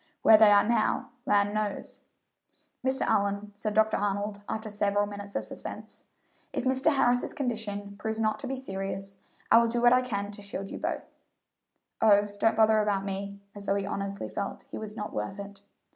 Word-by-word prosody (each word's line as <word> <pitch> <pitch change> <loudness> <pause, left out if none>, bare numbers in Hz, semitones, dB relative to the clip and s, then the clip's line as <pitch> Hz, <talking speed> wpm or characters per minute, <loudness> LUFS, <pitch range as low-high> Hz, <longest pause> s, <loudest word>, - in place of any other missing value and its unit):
Where 225 - +9
they 215 -1 +7
are 205 0 +5
now, 235 +3 +1 0.2
land 205 -2 +3
knows!" 215 -1 -3 0.8
"Mr. 260 0 +1
Allyn," 200 +1 0
said 210 0 -3
Dr. 220 0 +3
Arnold, 205 0 -2
after 220 0 -3
several 205 -1 +1
minutes 205 0 -8
of - - 0
suspense, - - -7 0.5
"if - - -2
Mr. 265 +4 +2
Harris's 245 -2 +2
condition 210 -6 -3
proves 220 +1 -3
not 215 -1 +1
to 270 - -5
be 270 - -2
serious 195 -5 -5 0.3
I 230 - +9
will 235 - +3
do 240 +1 -1
what 240 +1 +6
I 250 - +5
can 205 -5 -3
to 205 0 -10
shield 195 -1 -6
you - - -6
both." - - -3 1.0
"Oh, 205 -1 +5
don't 225 - +3
bother 220 0 +5
about 200 -2 0
me," 200 0 -5
as 200 -1 -9
though 195 - +2
he 200 -1 -1
honestly 200 0 -4
felt 200 - -5
he - - -6
was 215 -1 -7
not 210 -1 -5
worth 105 - -3
it. 200 0 -9
205 Hz, 190 wpm, -28 LUFS, 200-225 Hz, 1.0 s, Where